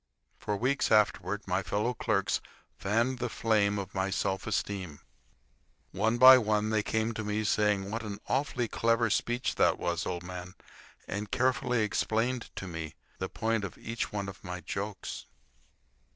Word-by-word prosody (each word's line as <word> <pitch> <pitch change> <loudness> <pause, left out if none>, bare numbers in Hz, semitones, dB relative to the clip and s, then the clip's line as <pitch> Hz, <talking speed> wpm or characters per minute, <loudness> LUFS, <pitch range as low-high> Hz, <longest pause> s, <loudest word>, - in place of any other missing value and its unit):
For 105 - -2
weeks 130 +4 +1
afterward 105 -1 +2
my 95 +1 +1
fellow 105 +6 -1
clerks 110 - 0 0.3
fanned 115 +6 0
the 120 - -1
flame 105 -3 +2
of 100 -1 -5
my 95 0 0
self 95 0 -1
esteem. 95 -7 -2 0.9
One 110 +2 +1
by 130 +1 +10
one 105 -1 +1
they 110 -1 +2
came 110 +2 -1
to 110 - -4
me, 105 +1 -1
saying 105 -1 +1
what 115 +1 -2
an 105 -3 -5
awfully 130 -3 0
clever 115 0 +1
speech 120 +4 0
that - - +4
was, 85 -1 -2
old 90 -1 -3
man, 90 0 -7 0.5
and 100 +1 -4
carefully 125 -1 +1
explained 115 +4 0
to - - -5
me 80 -3 -6 0.2
the 95 - -3
point 115 -1 -1
of 100 - -6
each 115 0 -4
one 100 -1 -3
of 100 -1 -9
my 90 -1 -5
jokes. 100 +2 -5
105 Hz, 160 wpm, -30 LUFS, 95-115 Hz, 0.9 s, by